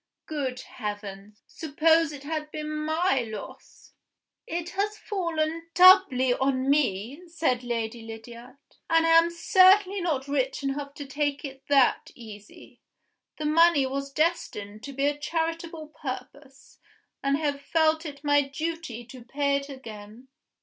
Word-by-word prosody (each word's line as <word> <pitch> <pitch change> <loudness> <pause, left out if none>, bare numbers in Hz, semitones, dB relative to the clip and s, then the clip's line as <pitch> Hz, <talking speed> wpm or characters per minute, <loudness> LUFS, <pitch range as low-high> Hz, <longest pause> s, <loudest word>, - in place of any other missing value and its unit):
Good 265 -5 -3
heavens! 205 -2 -8
suppose 320 +1 +2
it 285 -2 -9
had 305 0 -4
been 305 0 -5
my 315 -1 +1
loss!" 220 -2 -10 0.5
"It 345 +1 -4
has 420 +2 -2
fallen 330 -5 -2
doubly 360 -9 +7
on 265 0 0
me," 270 - 0
said 315 -7 -1
Lady 230 -1 -3
Lydiard; 235 +3 -11 0.3
"and 330 0 +4
I - - +3
am 330 +1 +6
certainly 380 +3 +4
not 290 -6 -1
rich 275 -1 -1
enough 280 +1 -3
to 285 - -7
take 285 +1 -2
it 270 -1 -9
that 275 -3 +3
easy. 210 -3 -13 0.6
The 305 - -4
money 320 -2 +4
was 275 +1 -4
destined 215 -10 -2
to 275 -1 -9
a 290 0 +1
charitable 325 0 -3
purpose; 275 -1 -9 0.4
and 275 0 +1
I - - -6
have 285 -2 -1
felt 315 0 +2
it 290 -3 -8
my 290 0 +4
duty 285 -3 -5
to 245 +1 -12
pay 280 +3 0
it 280 0 -7
again." 230 -2 -11
285 Hz, 140 wpm, -26 LUFS, 255-325 Hz, 0.6 s, doubly